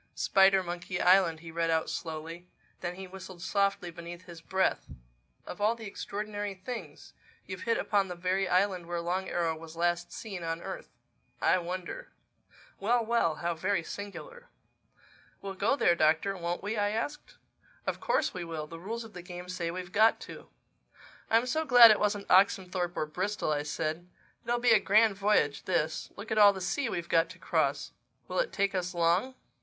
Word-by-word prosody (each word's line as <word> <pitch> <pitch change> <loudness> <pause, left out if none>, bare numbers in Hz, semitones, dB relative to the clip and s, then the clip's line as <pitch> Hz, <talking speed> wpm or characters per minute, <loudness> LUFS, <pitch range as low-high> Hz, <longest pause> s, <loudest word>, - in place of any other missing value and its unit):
"Spidermonkey 185 -2 +2
Island," 180 -3 +4
he 165 -1 -9
read 165 0 -1
out 160 -1 +1
slowly. 165 +2 -6 0.3
Then 175 0 -4
he 190 +1 -7
whistled 185 -1 -10
softly 195 -2 0
beneath 170 +1 -9
his 170 -2 -11
breath. 190 +3 0 0.6
"Of 180 - -8
all 215 +3 +3
the 225 -1 -9
extraordinary 205 0 -5
things! 230 +6 -8 0.3
You've 185 -1 -7
hit 230 - +3
upon 200 -2 +1
the 180 - -6
very 185 +2 0
island 185 -1 +1
where 175 0 -2
Long 180 +3 -2
Arrow 165 -2 0
was 160 0 -11
last 175 +1 0
seen 200 -5 -7
on 165 0 -3
earth—I - - -3
wonder—Well, 200 - -5
well! 220 -9 +2
How 170 +2 -2
very 185 +2 -1
singular!" 475 - -8 0.9
"We'll 195 -1 -6
go 205 +8 +1
there, 175 -11 +4
Doctor, 160 +4 +2
won't 175 0 -3
we?" 210 +2 -2
I 205 0 +2
asked. 230 +8 -4 0.5
"Of - - -2
course - - 0
we 180 - -5
will. 165 -2 -5
The 165 +2 -10
rules 225 +6 -5
of 225 - -12
the 180 - -8
game 180 0 -9
say 180 -2 -3
we've 180 +1 -6
got 220 +3 +4
to." - - -10 0.8
"I'm 225 +2 +4
so 315 +5 0
glad 245 -6 +9
it 215 - +3
wasn't 205 -1 0
Oxenthorpe 185 -2 +2
or - - 0
Bristol," 185 +3 -2
I 145 -1 0
said. 160 +3 -3 0.4
"It'll 240 0 +2
be 240 0 +3
a 220 - +7
grand 215 +1 +4
voyage, 195 -8 +1
this. 165 -4 -1
Look 205 +2 -9
at 215 - +2
all 205 -1 +8
the 190 - -6
sea 230 +8 -1
we've 170 -4 -4
got 165 -1 +3
to - - -11
cross. - - 0 0.4
Will - - -2
it - - 0
take 200 0 0
us 180 -1 -2
long?" 175 +10 +2
185 Hz, 180 wpm, -30 LUFS, 170-205 Hz, 0.9 s, glad